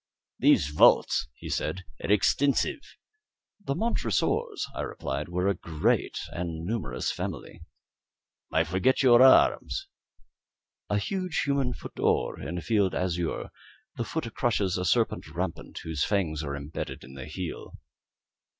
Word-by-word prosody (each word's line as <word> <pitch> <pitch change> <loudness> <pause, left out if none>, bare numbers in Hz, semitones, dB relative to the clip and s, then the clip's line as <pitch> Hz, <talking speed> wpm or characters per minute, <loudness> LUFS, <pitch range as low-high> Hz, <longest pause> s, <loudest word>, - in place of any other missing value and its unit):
"These 70 - +4
vaults," 75 -1 +4
he - - -9
said, 95 - -2 0.2
"are - - 0
extensive." 135 +7 +2 0.8
"The 140 - -1
Montresors," 140 - 0
I - - -4
replied, 70 +4 -4
"were 90 +2 0
a 100 - +3
great 80 -3 0
and 85 -2 -4
numerous 85 - -2
family." - - -6 0.9
"I 80 - +3
forget 95 - +1
your 120 -2 +7
arms." 130 0 +5 1.0
"A 105 - +2
huge 185 - -1
human 140 -3 0
foot - - -9
d'or, - - 0
in 90 - -4
a - - -3
field 105 -4 +1
azure; 90 -2 -2 0.4
the - - -2
foot 115 -3 -4
crushes 100 -6 +1
a 90 - -2
serpent 80 - +1
rampant - - -5
whose 80 -3 -1
fangs 80 -7 0
are 70 -2 -3
imbedded 70 +2 -6
in 65 - -12
the 65 -1 -8
heel." 85 +3 -6
95 Hz, 135 wpm, -28 LUFS, 80-120 Hz, 1.0 s, your